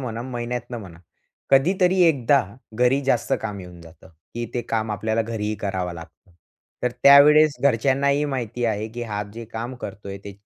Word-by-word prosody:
म्हणा, 115 -3 -5
महिन्यातनं 120 -1 -5
म्हणा. 90 -5 -11 0.5
कधीतरी 180 +6 +3
एकदा 140 -4 +3 0.3
घरी 125 +4 +2
जास्त 130 -1 0
काम 105 -3 -5
येऊन 90 -1 -12
जातं, 85 +2 -16 0.3
की 120 0 -3
ते 120 - -1
काम 110 -1 -1
आपल्याला 110 +2 -1
घरीही 110 -1 -3
करावं 95 -4 -3
लागतं. 85 +2 -14 0.5
तर 125 - +1
त्यावेळेस 150 +2 +7
घरच्यांनाही 140 +3 +2
माहिती 125 -4 -3
आहे, 110 -1 -1
की 120 +2 -7
हा 105 -3 -3
जे 115 0 -7
काम 120 +3 -5
करतोय 100 0 -7
ते 100 - -7
120 Hz, 160 wpm, -23 LUFS, 105-135 Hz, 0.5 s, त्यावेळेस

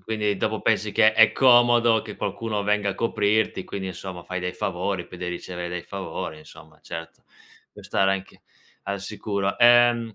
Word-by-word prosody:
quindi 105 0 -2
dopo 110 +2 -2
pensi 105 -1 0
che 110 0 +5
è 110 0 +5
comodo 120 -3 +5
che 105 -2 -9
qualcuno 105 +1 -3
venga 105 0 +1
a - - -5
coprirti; 105 -2 0
quindi 95 -1 -6
insomma 90 -1 -8
fai 90 +1 -5
dei 90 0 -3
favori, 90 0 -3
poi 90 - -12
dei 90 0 -4
ricevere 90 0 -6
dei 90 0 -5
favori 95 -5 -6
insomma 75 0 -16
certo. 80 0 -9 0.5
Puoi - - -14
stare 95 0 +1
anche 95 0 -7 0.4
al 100 -1 -4
sicuro. 100 -1 -3
Ehm, 120 -2 +5
100 Hz, 170 wpm, -24 LUFS, 90-110 Hz, 0.5 s, che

